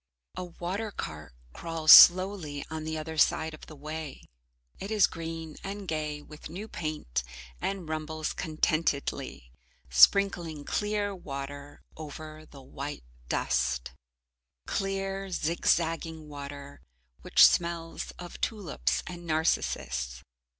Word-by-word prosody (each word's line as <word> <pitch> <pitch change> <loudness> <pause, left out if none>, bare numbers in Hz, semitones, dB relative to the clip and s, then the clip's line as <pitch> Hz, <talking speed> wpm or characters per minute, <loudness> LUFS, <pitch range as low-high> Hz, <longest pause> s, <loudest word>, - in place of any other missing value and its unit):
A - - -4
water 180 +5 -4
cart 75 - -7 0.2
crawls 165 -2 +2
slowly 180 -5 +8
on 160 -1 -4
the 160 0 -3
other 160 0 -4
side 160 +2 +3
of 155 - -11
the 155 - -11
way. 155 0 -7 0.6
It 195 - -5
is 215 -2 +5
green 165 -1 -6
and 200 0 -6
gay 150 -2 -3
with 150 0 -11
new 195 +7 -6
paint, 155 - -3 0.4
and 195 -4 -3
rumbles 155 0 -3
contentedly, 150 - -1 0.4
sprinkling 160 - +4
clear 210 -1 -1
water 140 -3 -7
over 155 0 -9
the 140 -2 -13
white 140 - -6 0.3
dust. 60 0 0 0.7
Clear 195 0 -2
zigzagging 165 -1 0
water, 140 -1 -9 0.4
which - - +7
smells 170 -1 0
of 175 -1 -9
tulips 205 -8 -1
and 175 -1 -8
narcissus. 65 - -1
160 Hz, 115 wpm, -29 LUFS, 145-175 Hz, 0.7 s, slowly